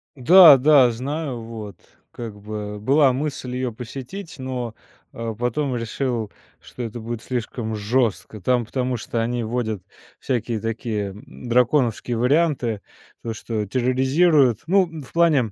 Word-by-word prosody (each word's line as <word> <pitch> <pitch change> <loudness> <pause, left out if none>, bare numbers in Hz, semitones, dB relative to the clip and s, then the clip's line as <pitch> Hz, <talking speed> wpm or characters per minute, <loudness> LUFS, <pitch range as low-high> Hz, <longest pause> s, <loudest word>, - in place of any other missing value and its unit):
Да, 160 +2 +9
да, 135 -1 +6
знаю, 135 +1 -4
вот 110 -4 -8 0.4
как 110 -3 -8
бы 105 0 -6
была 135 +4 +4
мысль 130 -2 -4
ее 130 -1 -2
посетить, 135 - -8
но, 125 -3 -4 0.4
а, 115 -1 -5
потом 125 +4 -1
решил, 115 -1 -2 0.3
что - - -10
это 120 0 -5
будет 115 0 -5
слишком 115 -2 -4
жестко, 110 0 -1
там 125 +3 +1
потому 125 +1 -2
что 115 +1 -3
они 120 +1 -1
вводят 110 -4 -3 0.4
всякие 120 -3 -2
такие, 110 -2 -3
м, 105 +5 -12
драконовские 120 -1 +2
варианты, 125 -4 +1 0.4
то 115 - -3
что 110 -1 -4
терроризируют. 130 - +3
Ну, 170 -4 +1
в - - -16
плане, 155 -10 +3
120 Hz, 135 wpm, -22 LUFS, 115-135 Hz, 0.4 s, Да